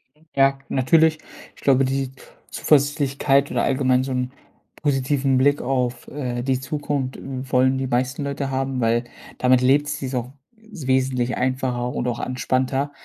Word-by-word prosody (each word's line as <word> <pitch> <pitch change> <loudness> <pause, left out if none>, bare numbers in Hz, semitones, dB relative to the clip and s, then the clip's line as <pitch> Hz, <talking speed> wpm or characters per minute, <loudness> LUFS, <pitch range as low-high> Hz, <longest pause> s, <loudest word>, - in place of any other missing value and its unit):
Mhm. 155 +1 -27
Ja, 135 0 +4
natürlich. 155 +4 +3 0.4
Ich - - -18
glaube, 135 -1 +4
die 135 0 -1 0.4
Zuversichtlichkeit 140 -1 +2
oder - - 0
allgemein 130 -1 +2
so 135 - -4
'n 125 0 -1 0.5
positiven 135 -1 +1
Blick 145 +2 +3
auf, 125 -1 -1
äh, 125 -4 -3
die 130 -1 0
Zukunft, 140 -1 -3
w 130 -1 -7
wollen 130 +1 +3
die 130 0 -2
meisten 125 +3 -1
Leute 140 -1 -3
haben, 135 -1 -1
weil 115 +1 +2 0.3
damit 125 0 +4
lebt 140 +3 +3
sich's 140 -3 -4
auch 125 0 -3 0.3
wesentlich 130 - -1
einfacher 125 -1 -1
und 125 - -2
auch 120 -1 -2
entspannter. 130 +2 -1
130 Hz, 150 wpm, -22 LUFS, 125-140 Hz, 0.5 s, Ja